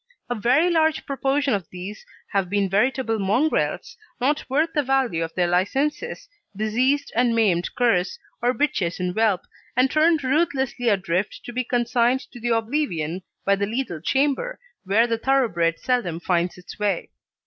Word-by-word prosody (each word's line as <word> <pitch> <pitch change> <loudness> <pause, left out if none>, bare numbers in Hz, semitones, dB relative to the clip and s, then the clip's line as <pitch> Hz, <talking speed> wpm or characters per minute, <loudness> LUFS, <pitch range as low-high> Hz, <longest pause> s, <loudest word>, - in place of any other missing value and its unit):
A - - +3
very 255 - +3
large 315 -2 +2
proportion 275 0 0
of 195 -6 -2
these 185 +4 -8 0.2
have 195 -3 0
been 200 0 +1
veritable 225 +2 +1
mongrels, 220 +11 0 0.2
not 280 +4 +1
worth 310 +5 +1
the 295 - +2
value 260 - +1
of 165 - -4
their 180 - +2
licences 265 - -1 0.3
diseased 245 +7 +1
and 240 0 +3
maimed 190 -7 +1
curs, 210 -7 +1 0.2
or 240 +1 +3
bitches 255 - -1
in 180 0 -1
whelp, 215 -3 +2 0.5
turned 310 -1 +3
ruthlessly 265 -4 +1
adrift 190 -1 -1
to 240 - -7
be 255 +1 0
consigned 245 +1 +1
to 240 - -10
the 240 +1 -2
oblivion 220 - -1 0.2
of 200 0 +3
the 200 - 0
lethal 220 - -3
chamber, 285 - 0 0.3
where 205 +5 +4
the 230 -1 -1
thoroughbred 225 -12 +2
seldom 205 -10 -1
finds 175 0 0
its 180 +4 -12
way. 205 -4 -1
235 Hz, 155 wpm, -23 LUFS, 190-270 Hz, 0.5 s, where